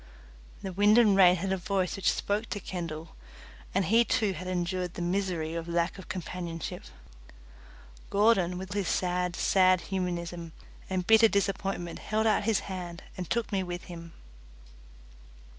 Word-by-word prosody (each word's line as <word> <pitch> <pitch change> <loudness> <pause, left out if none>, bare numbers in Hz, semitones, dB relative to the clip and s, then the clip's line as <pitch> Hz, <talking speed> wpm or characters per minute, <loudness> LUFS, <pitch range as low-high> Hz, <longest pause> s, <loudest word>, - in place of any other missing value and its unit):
The 190 -1 -4
wind 205 +4 +5
and 215 -5 +6
rain 180 -2 +7
had 190 +2 -3
a 190 - +1
voice 185 0 -1
which 195 - +2
spoke 210 +3 -1
to 205 - -3
Kendall, 165 -4 -6 0.6
and 195 0 +1
he 225 +6 +5
too 220 -5 +1
had 180 +1 -7
endured 180 0 -2
the - - -5
misery 175 -3 -1
of 165 0 -4
lack 170 +3 -1
of 190 - -11
companionship. 170 - -5 1.2
Gordon, 200 -4 +3
with 185 0 -6
his 200 -3 -1
sad, 180 -1 0
sad 185 -1 +4
humanism 175 -2 -3 0.4
and 185 -1 -1
bitter 225 +2 +7
disappointment, 195 -4 -1
held 220 +1 -1
out 215 -2 +2
his 225 -2 +2
hand 180 -2 -6
and 180 -2 -6
took 235 -1 -1
me 195 -2 +1
with 175 -1 -5
him. 170 -1 -10
185 Hz, 155 wpm, -29 LUFS, 175-200 Hz, 1.2 s, rain